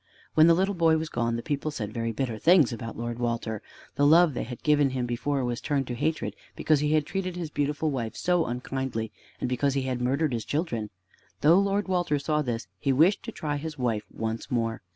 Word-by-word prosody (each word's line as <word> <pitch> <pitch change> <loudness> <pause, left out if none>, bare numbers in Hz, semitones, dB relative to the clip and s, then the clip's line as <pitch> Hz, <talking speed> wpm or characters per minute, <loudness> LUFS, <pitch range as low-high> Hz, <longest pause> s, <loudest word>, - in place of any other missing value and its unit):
When 160 +1 +6
the 170 - +6
little 190 +3 +1
boy 165 -3 +3
was 160 0 -3
gone, 115 -3 -1
the 115 - -4
people 145 0 -2
said 110 -8 -5
very 115 0 -2
bitter 115 -1 -3
things 165 - +5
about 115 0 -6
Lord 120 0 -4
Walter. 115 -3 -2 0.4
The 145 - +4
love 165 0 +6
they - - -3
had 120 +1 -8
given 145 -2 +4
him 130 -1 -2
before 130 +3 -1
was 120 -1 -3
turned 140 -3 -1
into - - -1
hatred 160 +7 -1 0.2
because 155 -2 +2
he 150 +1 +1
had 155 -2 +3
treated 185 0 -3
his 170 -3 -5
beautiful 145 +2 0
wife 120 -5 -3
so 175 -2 +1
unkindly, 125 -2 -3 0.3
and - - -1
because 130 +3 0
he 135 - 0
had 130 -1 -2
murdered 135 +3 +1
his 115 -2 -2
children. 125 -9 -2 0.5
Though 165 +5 +6
Lord 200 +1 +1
Walter 175 -5 +1
saw 150 +2 0
this, 120 -5 -3
he 140 - +1
wished 160 +10 +4
to 230 - -5
try 150 -7 -3
his 155 +1 -6
wife 115 -5 -1
once 110 0 -4
more. 115 -2 -1
140 Hz, 220 wpm, -27 LUFS, 120-160 Hz, 0.5 s, When